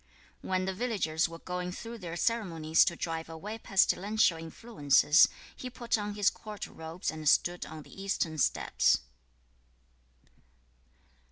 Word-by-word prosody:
2. - - -10
When 185 0 0
the 190 - -2
villagers 185 -8 0
were 165 - -8
going 180 +1 -4
through 230 +5 -8
their 170 -3 -6
ceremonies 165 -9 +2
to 170 - 0
drive 165 -1 -4
away 205 +8 -7
pestilential 200 -1 +2
influences, 160 - +3 0.3
he 255 - -6
put 240 -1 -1
on 205 -1 -3
his 205 -1 +3
court 210 -2 -8
robes 160 +3 -5
and 155 -2 0
stood 175 +2 +2
on 155 -1 -9
the 195 - -12
eastern 170 -5 -1
steps. - - +2
180 Hz, 140 wpm, -30 LUFS, 160-210 Hz, 0.3 s, influences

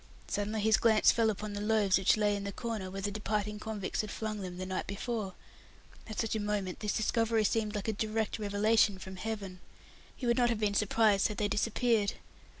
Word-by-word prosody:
Suddenly 210 +1 -2
his 220 +1 +4
glance 220 -2 +5
fell 230 -1 +2
upon 210 0 -4
the 205 - -4
food 210 - -2
rations 210 -4 +4
which 190 - +4
lay 210 -1 +2
in 200 - -4
the 200 - -3
corner 220 -3 -4
where 195 +1 -6
the 205 - -1
departing 210 0 -2
convicts 215 -3 -3
had 215 - -6
flung 215 0 -4
them 180 -2 -6
the 185 - -4
night 185 0 -3
before. 200 -1 -3 0.7
At 215 - -5
such 225 -1 -2
a - - 0
moment, 205 -3 -2
this 210 -1 -1
discovery 225 0 +1
seemed 215 0 0
like 205 0 -3
a 220 - +1
direct 220 +1 -2
revelation 210 0 +3
from 190 0 -9
Heaven. 200 -3 -5 0.6
He 255 - -6
would 235 0 +2
not 240 -1 +4
have 230 -2 0
been 210 -2 +1
surprised 210 0 +3
had 210 - -6
they 210 - +1
disappeared. 220 0 +1
210 Hz, 215 wpm, -31 LUFS, 200-220 Hz, 0.7 s, glance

